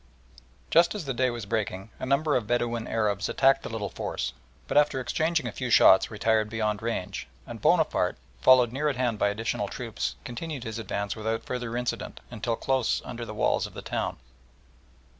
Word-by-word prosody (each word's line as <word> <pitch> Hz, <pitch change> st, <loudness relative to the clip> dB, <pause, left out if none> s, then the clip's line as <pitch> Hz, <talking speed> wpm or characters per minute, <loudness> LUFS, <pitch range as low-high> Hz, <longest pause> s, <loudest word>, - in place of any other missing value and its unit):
Just 170 Hz, +4 st, +5 dB
as 205 Hz, -, -4 dB
the 135 Hz, -, -2 dB
day 130 Hz, +1 st, +2 dB
was 120 Hz, -3 st, -5 dB
breaking 105 Hz, -1 st, -3 dB
a -, -, -4 dB
number 145 Hz, +3 st, +2 dB
of 115 Hz, -4 st, 0 dB
Bedouin 120 Hz, -1 st, 0 dB
Arabs 105 Hz, -3 st, 0 dB
attacked 135 Hz, 0 st, +4 dB
the -, -, -6 dB
little 110 Hz, -3 st, -4 dB
force, 65 Hz, 0 st, -3 dB, 0.3 s
but -, -, -3 dB
after 145 Hz, -2 st, +4 dB
exchanging 160 Hz, +3 st, 0 dB
a 120 Hz, -, -2 dB
few 125 Hz, +4 st, -4 dB
shots 95 Hz, -4 st, +7 dB
retired 110 Hz, 0 st, +1 dB
beyond 105 Hz, -2 st, -1 dB
range, 100 Hz, -, -3 dB, 0.2 s
and -, -, -8 dB
Bonaparte, -, -, +2 dB, 0.2 s
followed 125 Hz, -, +6 dB
near 145 Hz, +4 st, 0 dB
at 140 Hz, -, -1 dB
hand 120 Hz, -4 st, 0 dB
by -, -, +3 dB
additional 110 Hz, +3 st, -2 dB
troops, -, -, -4 dB
continued 140 Hz, +2 st, -5 dB
his 110 Hz, -1 st, -5 dB
advance 100 Hz, -1 st, -3 dB
without 110 Hz, +1 st, -2 dB
further 120 Hz, -2 st, -3 dB
incident 125 Hz, 0 st, -3 dB
until 115 Hz, 0 st, -2 dB
close 130 Hz, 0 st, 0 dB
under 120 Hz, 0 st, -6 dB
the 110 Hz, -, -7 dB
walls -, -, +1 dB
of -, -, -16 dB
the -, -, -7 dB
town. -, -, -2 dB
115 Hz, 185 wpm, -27 LUFS, 110-130 Hz, 0.3 s, shots